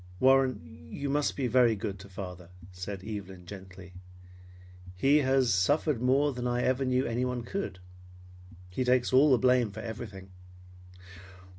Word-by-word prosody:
"Warren, 130 -8 +1
you 140 -1 -3
must 145 0 0
be 135 - -1
very 120 -1 +4
good 100 -1 -5
to 100 +1 -12
father," 90 -3 -8 0.2
said 90 +1 -7
Evelyn 95 -4 -7
gently. 95 -1 -11 1.0
"He 135 +11 +4
has 130 -5 +2
suffered 125 - +1
more 135 +3 +2
than 125 0 -3
I 120 0 0
ever 130 +1 +1
knew 130 +1 +1
anyone 125 +1 -2
could. 115 - -4 0.9
He 130 - -1
takes 125 0 +2
all 140 +4 +6
the 130 - +6
blame 125 -1 +3
for 105 +2 -8
everything." 105 -4 -8
120 Hz, 145 wpm, -29 LUFS, 95-130 Hz, 1.0 s, all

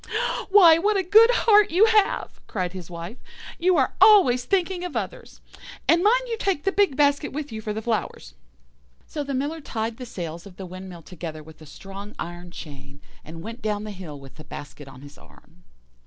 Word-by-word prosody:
"'Why, 350 -5 +7
what 410 +3 +1
a 380 - +1
good 435 +6 +6
heart 420 -4 +4
you 375 +6 +5
have!' 435 -3 +1
cried 185 -3 -3
his 180 -2 -9
Wife; 175 +7 -8 0.4
'you 360 +1 +3
are - - +1
always 260 - +6
thinking 370 -2 0
of 360 - -4
others. - - -7 0.5
And 340 +2 +4
mind - - +4
you 465 -2 -4
take 385 -7 -1
the 390 - +1
big 395 -8 +2
basket 285 +1 +2
with 295 -1 -5
you 220 -1 -6
for 215 - -4
the 220 +1 -5
flowers.' 215 - -3 0.7
"So 295 - -5
the 275 -1 -4
Miller 295 +5 -3
tied 225 -3 -4
the 250 - -8
sails 170 -2 -7
of 180 -3 -15
the 190 - -7
windmill 185 -1 -10
together 155 -3 -8
with 160 +1 -16
a 155 - -12
strong 195 +6 -10
iron 175 +1 -7
chain, 140 -4 -11 0.2
and 165 +2 -10
went 230 +4 -8
down 210 -1 -2
the 215 - -6
hill 175 -7 -9
with 135 +1 -15
the 155 - -11
basket 145 -1 -10
on 135 -1 -13
his 145 0 -14
arm. 175 +2 -21
220 Hz, 200 wpm, -24 LUFS, -, 0.7 s, Why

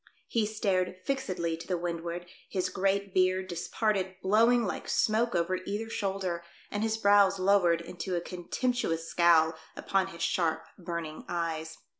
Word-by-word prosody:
He 225 -3 +1
stared 190 -4 0
fixedly 185 -12 -1
to 165 - -10
the 180 - 0
windward, 170 0 -4 0.2
his 185 -1 -1
great 195 0 0
beard, 185 0 +2
disparted, 190 +2 -1
blowing 230 +4 +4
like 190 - -4
smoke 225 0 +2
over 175 +2 +1
either 205 +5 -4
shoulder, 190 -5 -2 0.3
and 205 - -2
his 220 0 0
brows 200 -2 +5
lowered 185 -3 +3
into 175 +2 -4
a - - +1
contemptuous 175 -1 -2
scowl 165 -2 +4 0.2
upon 195 -1 0
his 170 -3 -6
sharp, 165 -2 0
burning 170 -3 -5
eyes. 165 -2 -3
185 Hz, 145 wpm, -30 LUFS, 170-200 Hz, 0.3 s, brows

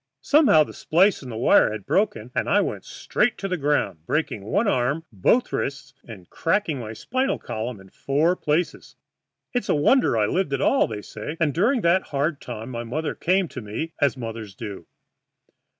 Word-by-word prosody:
Somehow 285 - +5
that - - -10
splice 185 +5 +2
in 130 - -9
the 110 - -6
wire 115 - +4
had 105 -2 -6
broken, 125 - 0
and - - -1
I - - +4
went - - -2
straight - - -1
to 195 - -4
the 185 - -1
ground, 140 - 0
breaking 150 -8 -1
one 205 - 0
arm, 140 0 0
both 110 - +2
wrists, 135 -1 -3
and 100 -7 -11
cracking 165 -4 -1
my 110 -3 -6
spinal 260 - -1
column 110 0 -5
in 95 0 -16
four 155 +6 +1
places. 160 +1 -2 0.6
It's 245 - -2
a - - +3
wonder 150 - +3
I 105 - +3
lived 175 - -1
at 135 - 0
all, 275 - +3
they 105 -2 -6
say, 150 +10 -7
and 155 -4 +1
during 230 - +2
that 175 +1 +3
hard 145 +2 -1
time 120 0 -7
my 120 -1 -4
mother 150 +7 -3
came 185 +1 +1
to 130 - -7
me, 115 +10 -5
as 140 -2 +2
mothers 115 -4 -7
do. 100 -7 -8
140 Hz, 190 wpm, -24 LUFS, 115-175 Hz, 0.6 s, Somehow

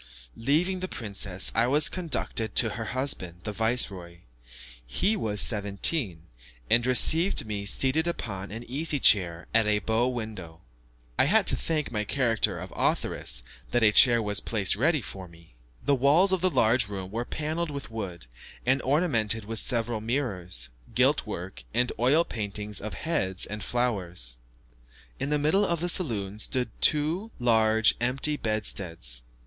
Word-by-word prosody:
Leaving 165 +10 +1
the 185 - -3
princess, 100 - -2
I 115 +1 +2
was 145 +4 +3
conducted 150 - -3
to 110 - +4
her 115 +2 -5
husband, 105 -9 -3
the 105 - -4
viceroy. 100 -6 -1 0.6
He 185 - +1
was 105 - -2
seventeen, 100 - +1 0.5
and 120 - +4
received 160 +8 +3
me 100 -2 -4
seated 135 +9 +1
upon 100 - -4
an 115 +3 -7
easy 145 +3 0
chair 90 -7 +3
at 115 -1 +4
a 105 0 +3
bow 110 +3 0
window. 110 -10 -6 0.6
I - - +6
had - - +3
to - - +3
thank 155 -3 -1
my 105 -2 -1
character 115 0 0
of - - -9
authoress, - - -1 0.3
that 120 -1 +1
a 105 - +6
chair 120 +1 +6
was 105 -1 0
placed 105 -5 0
ready 150 +6 +1
for 95 -2 -7
me. 85 -4 -19 0.3
The 145 - +3
walls 145 +9 +4
of 190 -2 +1
the 185 - +4
large 115 - +2
room 95 -2 -6
were 115 +2 -2
panelled 155 +5 -3
with 140 -4 -7
wood, 95 - -6 0.4
and 130 +2 +2
ornamented 115 - +1
with 115 +1 -2
several 115 -3 +1
mirrors, 95 - -3 0.3
gilt - - +2
work, 90 +2 -7
and 125 +1 +2
oil 135 +8 +4
paintings 105 -1 -4
of 110 - -6
heads 95 - 0
and 105 0 -6
flowers. 90 - -2 0.8
In 140 - -2
the 150 - +2
middle 155 +8 +2
of 170 -4 0
the 175 +2 -2
saloon 105 - -2
stood 125 0 0
two 160 +8 +2
large 110 -3 +3
empty 135 +5 +2
bedsteads. 90 - -2
115 Hz, 155 wpm, -27 LUFS, 100-140 Hz, 0.8 s, I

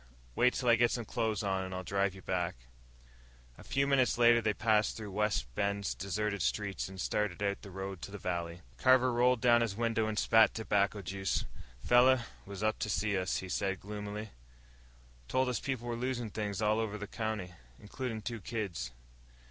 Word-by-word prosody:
Wait 125 0 +3
till 125 - -2
I 120 - +7
get 120 +1 +4
some 120 -2 -3
clothes 110 0 -1
on, 95 -1 0
and 95 0 -5
I'll 95 - -4
drive 100 +1 0
you 95 - -12
back." 90 -2 -1 1.0
A - - -11
few 140 0 +1
minutes 135 -3 +3
later 120 0 +6
they 110 -1 +2
passed 110 0 +2
through 105 -2 -6
Wide 105 +1 +1
Bend's 100 +5 -1
deserted 100 +1 -2
streets 100 +2 -1
and 95 0 -10
started 105 +1 -1
out 100 0 -1
the 100 - -10
road 95 -1 -6
to - - -6
the 105 - -7
valley. 85 -2 -3 0.2
Carver 130 - +4
rolled 125 0 +3
down 120 -1 +5
his 115 -4 -1
window 115 -1 0
and 110 -1 -3
spat 110 0 +5
tobacco 100 -2 0
juice. 95 0 -1 0.4
"Feller 125 0 +5 0.2
was 100 0 -6
up 110 0 +1
to 105 - -2
see 105 +1 0
us," 95 0 0
he - - -8
said 95 0 -1
gloomily. 105 +1 -6 1.0
"Told 130 - +1
us 125 -3 0
people 130 -4 -3
was 120 0 -3
losin' 120 -3 -2
things 105 -1 -3
all 105 +1 +3
over 110 -2 -2
the 105 - -5
county 105 -4 -4 0.3
includin' 110 0 -5
two 115 +1 -4
kids. 95 - -3
105 Hz, 190 wpm, -32 LUFS, 100-115 Hz, 1.0 s, I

